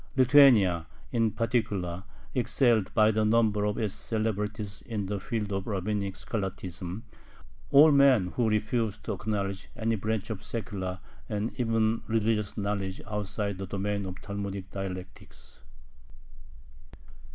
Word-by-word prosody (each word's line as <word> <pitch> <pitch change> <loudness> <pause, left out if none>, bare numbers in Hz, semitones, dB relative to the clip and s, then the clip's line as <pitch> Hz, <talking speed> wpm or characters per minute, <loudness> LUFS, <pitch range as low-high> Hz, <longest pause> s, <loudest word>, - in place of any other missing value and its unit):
Lithuania, 120 - +6 0.2
in 115 -2 +2
particular, 105 -5 -1 0.3
excelled 120 -4 +2
by 110 -1 +5
the 110 0 +1
number 110 -1 +3
of 105 0 -1
its 105 -3 -1
celebrities 105 -2 -3
in 105 -4 -2
the 100 +1 -3
field 105 0 -3
of 95 +2 -3
rabbinic 100 -1 -2
scholasticism, 95 -1 -5 0.7
all 150 +3 +8
men 135 -9 +5
who 120 -3 +1
refused 110 0 -1
to 110 - -2
acknowledge 100 -1 -3
any 115 -1 0
branch 110 +1 -2
of 105 -1 -5
secular 95 -5 -4 0.3
and 105 +1 -2
even 115 -1 +1
religious 110 -2 0
knowledge 100 -2 -2
outside 105 -1 -3
the 95 - -4
domain 100 +1 -2
of 95 0 -7
Talmudic 100 -2 -5
dialectics. 95 -2 -8
105 Hz, 125 wpm, -28 LUFS, 95-110 Hz, 0.7 s, all